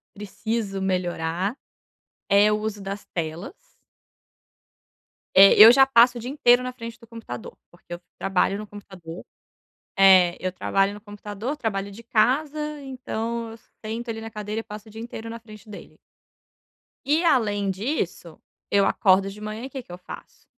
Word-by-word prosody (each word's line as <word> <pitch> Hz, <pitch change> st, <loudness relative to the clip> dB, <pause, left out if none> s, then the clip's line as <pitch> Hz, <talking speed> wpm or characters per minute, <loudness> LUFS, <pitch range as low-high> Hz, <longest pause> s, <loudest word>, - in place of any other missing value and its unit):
preciso 210 Hz, 0 st, -4 dB
melhorar, 180 Hz, -, -2 dB, 0.7 s
é 205 Hz, +1 st, +5 dB
o 210 Hz, -, +1 dB
uso 215 Hz, -2 st, -5 dB
das 200 Hz, +1 st, -6 dB
telas. 175 Hz, -, -6 dB, 1.6 s
Eh, 195 Hz, +1 st, +9 dB
eu 220 Hz, +2 st, +11 dB
já 270 Hz, +1 st, +6 dB
passo 245 Hz, -1 st, +5 dB
o -, -, -7 dB
dia 245 Hz, -, -6 dB
inteiro 250 Hz, -3 st, +4 dB
na 255 Hz, 0 st, -5 dB
frente 230 Hz, -2 st, -9 dB
do 230 Hz, -, -17 dB
computador, 220 Hz, -, -9 dB, 0.2 s
porque 175 Hz, 0 st, -12 dB
eu 175 Hz, -, -8 dB, 0.2 s
trabalho 195 Hz, +1 st, +1 dB
no 210 Hz, 0 st, -8 dB
computador 185 Hz, -5 st, -11 dB, 0.8 s
é, 185 Hz, -3 st, +6 dB
eu 185 Hz, 0 st, -3 dB
trabalho 195 Hz, +2 st, 0 dB
no 210 Hz, -, -10 dB
computador, 205 Hz, +5 st, -6 dB
trabalho 200 Hz, -7 st, -3 dB
de 210 Hz, +4 st, -12 dB
casa, 255 Hz, +7 st, +1 dB, 0.2 s
então 235 Hz, -3 st, -5 dB
eu -, -, -10 dB, 0.3 s
sento 230 Hz, +2 st, -5 dB
ali 225 Hz, -, -5 dB
na 225 Hz, 0 st, -8 dB
cadeira 210 Hz, +1 st, -5 dB
e -, -, -7 dB
passo 210 Hz, 0 st, -10 dB
o -, -, -14 dB
dia 220 Hz, -, -9 dB
inteiro 230 Hz, -1 st, -7 dB
na 230 Hz, -, -7 dB
frente 215 Hz, -2 st, -15 dB
dele. 205 Hz, -, -12 dB, 1.1 s
E 305 Hz, +5 st, +2 dB
além 205 Hz, -, +2 dB
disso, 190 Hz, -, -4 dB, 0.3 s
eu 200 Hz, -1 st, +3 dB
acordo 195 Hz, -1 st, +3 dB
de 205 Hz, +2 st, -11 dB
manhã, 215 Hz, +2 st, -6 dB
e -, -, -7 dB
que 270 Hz, -1 st, -7 dB
que 235 Hz, -, -17 dB
eu 175 Hz, -, -7 dB
faço? 180 Hz, -, -12 dB
210 Hz, 165 wpm, -24 LUFS, 195-235 Hz, 1.6 s, eu